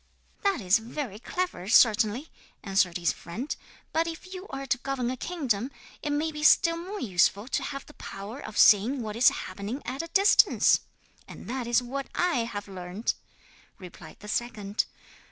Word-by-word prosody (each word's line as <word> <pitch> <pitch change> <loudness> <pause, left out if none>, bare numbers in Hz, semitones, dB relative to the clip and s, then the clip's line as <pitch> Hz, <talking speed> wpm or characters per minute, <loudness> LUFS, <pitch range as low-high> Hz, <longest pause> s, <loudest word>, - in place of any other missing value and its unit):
'"That 395 - +1
is 190 +4 +4
very 225 -2 -5
clever, 245 - -3
certainly," 225 +5 +4 0.3
answered 190 -3 +2
his 170 -1 +1
friend; 225 - -5 0.4
"but 325 +1 +2
if 335 +3 -7
you 375 +1 -7
are 275 0 -5
to 255 -1 0
govern 255 -2 -2
a - - -3
kingdom 260 - -2 0.3
it 295 - -3
may 300 +2 0
be 300 -1 -6
still 335 +2 +5
more 375 +5 -6
useful 200 - +2
to - - 0
have 275 -2 -5
the 300 - -15
power 205 +3 -8
of 220 -6 -8
seeing 230 +6 +5
what 210 -1 -5
is 240 +3 +7
happening 200 +7 -5
at 260 +4 -3
a 330 - -7
distance; 395 +4 +5 0.5
and - - -11
that 250 -1 -3
is 240 +1 +3
what 270 +3 -4
I 340 -10 +1
have 205 -2 -6
learnt," 185 +3 -3 0.6
replied 180 -2 -12
the 210 - -10
second. 210 -2 -1
245 Hz, 170 wpm, -28 LUFS, 205-300 Hz, 0.6 s, is